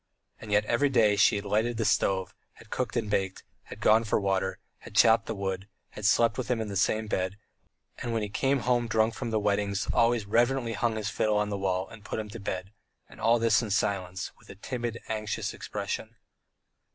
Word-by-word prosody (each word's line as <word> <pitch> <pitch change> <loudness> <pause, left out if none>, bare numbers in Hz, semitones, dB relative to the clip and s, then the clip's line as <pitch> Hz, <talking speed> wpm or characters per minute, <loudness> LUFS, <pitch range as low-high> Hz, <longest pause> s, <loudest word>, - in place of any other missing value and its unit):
And 110 - -9
yet, 105 0 +3
every 140 +6 +2
day, 110 -6 +4
she 100 - +5
had 100 0 -3
lighted 110 +3 0
the 115 - 0
stove 95 -3 +1 0.2
had - - -18
cooked 125 -1 -2
and 115 -2 -1
baked, 95 -2 -1 0.2
had - - -10
gone 110 +1 +5
for 110 - 0
the - - -1
water, 95 -1 0 0.2
had - - -13
chopped 110 +2 +5
the 110 - -3
wood, 95 -1 -3 0.2
had 105 - -7
slept 115 +3 +3
with 130 - -3
him 125 -2 +1
in 110 -1 -3
the 100 - -5
same 110 +3 +1
bed, 95 -2 -2 0.6
and 120 - -3
when 115 -2 0
he - - -2
came 135 +6 0
home 120 -1 +1
drunk 110 0 +2
from 120 +1 -4
the 110 -1 +1
weddings 100 -1 0
always 115 -2 +3
reverently 120 +2 +1
hung 110 +1 0
his 105 -2 -3
fiddle 110 -1 +1
on 105 0 0
the 100 - -2
wall 95 -1 -1
and 115 -2 -13
put - - -4
him 110 -1 -4
to 115 +3 -8
bed, 95 -1 -4 0.4
and - - -14
all 115 +2 +4
this 115 0 +3
in 110 - -4
silence, 95 -2 -1
with - - -21
a - - -9
timid, 120 +2 -4
anxious 110 -1 -3
expression. - - -5
110 Hz, 220 wpm, -28 LUFS, 100-115 Hz, 0.6 s, she